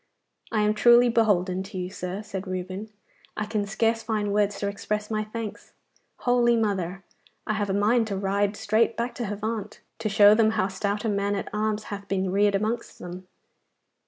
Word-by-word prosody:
'I 215 - +1
am 210 0 +3
truly 240 +3 +6
beholden 190 -5 +2
to 195 0 -7
you, 180 0 -4
sir,' 185 +3 -5
said 195 -2 -6
Reuben; 185 +3 -5 0.5
'I 215 - -1
can 210 -1 -2
scarce 225 +2 +1
find 210 -2 -1
words 205 -1 +1
to 200 - -2
express 210 +1 -3
my 215 0 0
thanks. 215 0 -7 0.5
Holy 240 -1 +4
mother! 195 -4 -1 0.4
I 215 - 0
have 205 -2 -1
a - - +1
mind 220 +3 +3
to 200 -3 -3
ride 200 +1 0
straight 220 +2 +1
back 235 +1 -2
to 240 - -4
Havant, 210 +1 -4 0.2
to 220 -1 -1
show 205 0 +7
them 220 0 +4
how 190 -2 +1
stout 200 +3 -2
a - - +2
man 200 0 0
at 195 - -4
arms 215 0 -1
hath 200 0 -7
been 190 -1 -1
reared 200 +1 +3
amongst 220 +4 -2
them. 180 +1 -9
210 Hz, 190 wpm, -26 LUFS, 195-220 Hz, 0.5 s, show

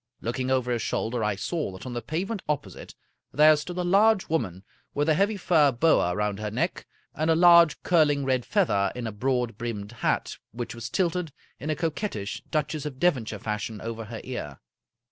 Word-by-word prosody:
Looking 125 +3 -3
over 130 -2 +1
his 120 -2 0
shoulder, 115 +1 -1
I 105 -1 0
saw 155 - -3
that 95 - -10
on 125 - -5
the 120 - -3
pavement 190 - -3
opposite 140 -11 -4 0.4
there 155 +2 +6
stood 160 +4 -6
a 180 - 0
large 200 +3 +3
woman 100 - -2 0.3
with 145 +1 +1
a 160 - +5
heavy 200 +6 +1
fur 160 -6 +4
boa 120 - +2
round 105 0 -1
her 105 0 -3
neck, 105 - -2 0.3
and 155 +2 -1
a 160 - +5
large 170 -1 +6
curling 150 -5 +3
red 130 -2 +1
feather 110 - +1
in 125 -1 -4
a 110 - -3
broad 120 0 -1
brimmed 110 -3 -4
hat 120 - -1 0.2
which 120 0 -5
was 115 -1 -6
tilted 175 0 -1 0.3
in 150 - -5
a 155 - +1
co 165 -1 -1
quettish 110 - -4
Duchess 155 -1 -2
of 135 -3 -7
Devonshire 130 -11 +1
fashion 105 +1 -4
over 115 0 -5
her 110 +1 -7
ear. 75 - -6
130 Hz, 195 wpm, -26 LUFS, 110-165 Hz, 0.4 s, there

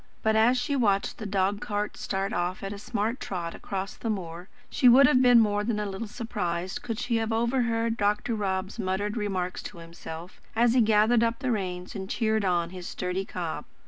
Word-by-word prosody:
But 220 0 +3
as 230 +4 +4
she 265 +3 -1
watched 200 -6 +1
the 215 - -4
dog 200 +1 0
cart 205 0 -2
start 195 +2 -2
off 175 +1 -2
at 195 +1 -4
a 200 - -8
smart 225 +3 -2
trot 170 -3 -4
across 195 0 -5
the 230 - -5
moor, 175 -3 -4 0.2
she 250 - +4
would 265 +3 +8
have 255 -1 +5
been 245 -2 +7
more 205 -2 +2
than 215 -1 -1
a 210 - -1
little 200 +3 -4
surprised 185 -6 -3
could 230 -2 -4
she 235 -1 0
have 225 0 -1
overheard 230 -1 +1
Dr. 210 +2 +1
Rob's 195 0 -2
muttered 205 +1 -1
remarks 190 -4 -2
to - - -9
himself, 165 0 -9
as 235 +1 +4
he 250 - +5
gathered 220 +2 +4
up 230 0 +1
the 255 - -1
reins 180 -4 -3
and 190 -2 -6
cheered 220 -2 +1
on 175 -2 +1
his 180 -1 -7
sturdy 180 +1 -3
cob. 170 -4 -4
205 Hz, 205 wpm, -27 LUFS, 185-230 Hz, 0.2 s, would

